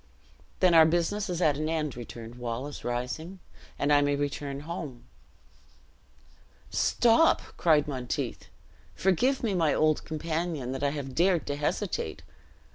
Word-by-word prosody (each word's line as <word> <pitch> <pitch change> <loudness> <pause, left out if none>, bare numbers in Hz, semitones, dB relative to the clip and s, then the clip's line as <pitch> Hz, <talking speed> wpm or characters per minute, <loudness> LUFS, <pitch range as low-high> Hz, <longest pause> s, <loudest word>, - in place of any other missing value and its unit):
"Then 180 -2 +5
our 160 -1 +8
business 175 +5 0
is 175 0 -1
at 150 -3 +3
an 155 +1 -2
end," 155 -4 -1
returned 115 -1 -8
Wallace, 125 +4 -5
rising, 125 +10 -4 0.4
"and 145 +1 +2
I 145 - +6
may 145 0 +2
return 140 -1 -3
home." 150 -6 -6 1.7
"Stop!" 240 +8 +4 0.2
cried 155 -3 +3
Monteith. 130 -4 -4 0.5
"Forgive 245 +9 +2
me, 220 -4 +1
my 165 -5 +2
old 155 -1 +2
companion, 160 -3 -3
that 135 - -4
I 140 - +2
have 140 -2 -5
dared 175 +1 +2
to 145 - -2
hesitate. 145 0 -2
150 Hz, 135 wpm, -28 LUFS, 140-170 Hz, 1.7 s, our